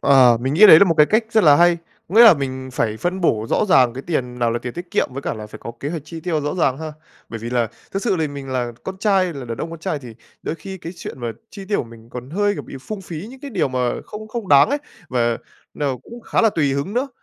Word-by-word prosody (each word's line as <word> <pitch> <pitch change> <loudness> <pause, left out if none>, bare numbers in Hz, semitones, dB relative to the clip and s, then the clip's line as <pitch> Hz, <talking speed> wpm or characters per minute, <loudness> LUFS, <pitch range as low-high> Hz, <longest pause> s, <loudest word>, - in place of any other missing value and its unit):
Ờ. 130 -4 +6
Mình 130 +3 -1
nghĩ 210 +5 +8
đấy 160 - +10
là 200 - +7
một 170 - +1
cái 150 - +6
cách 220 +1 +2
rất 220 -2 +3
là 145 -2 +7
hay. 175 0 +4 0.3
Có 190 - -7
nghĩa 235 +1 +9
là 215 - +9
mình 130 -2 -4
phải 110 -3 -1
phân 180 +8 -2
bổ 110 -9 +1
rõ - - +2
ràng 130 - +4
cái 130 - -6
tiền 125 -7 -3
nào 120 -1 +1
là 120 - -1
tiền 120 0 -6
tiết 175 0 -8
kiệm, - - +1
với 140 +1 -6
cả - - -2
là 110 -1 -8
phải - - -11
có 115 - -8
kế 145 - -3
hoạch 165 -4 -4
chi 165 +1 -8
tiêu 160 -3 -1
rõ 145 +3 -2
ràng 140 -6 +1
ha! 155 -1 -6 0.4
Bởi 115 - -6
vì 115 +2 -6
là 120 -3 +1 0.2
thực 195 - -2
sự 200 -6 +1
thì 155 -2 0
mình 140 -1 -8
là 125 -2 -2
con 190 0 -6
trai, 190 -4 +2
là 135 -3 -7
đàn 115 -1 -6
ông 165 - -4
con 165 - -8
trai, 155 -2 -3
thì 120 -4 -11 0.3
đôi 155 - -3
khi 190 +4 -8
cái 170 +1 -7
chuyện 130 - -8
mà 115 -1 -3 0.2
chi 195 -2 -9
tiêu 205 +1 0
của - - -2
mình 115 0 -15
còn 125 +2 -8
hơi, 205 +3 +1
kiểu, - - -6
bị - - -10
phung 210 +7 -6
phí 170 +1 -7
những 265 0 -13
cái 285 - -7
điều 185 - 0
mà 130 0 -3 0.3
không 215 +1 -9
không 230 -4 -5
đáng 140 -1 +7
ấy, 290 - +1 0.3
và 120 -2 0 0.4
nó 140 -4 -1
cũng 235 +1 -11
khá - - 0
là 225 - +5
tùy 145 -7 +1
hứng 140 +9 -3
nữa. 265 +3 0
150 Hz, 300 wpm, -20 LUFS, 125-190 Hz, 0.4 s, đấy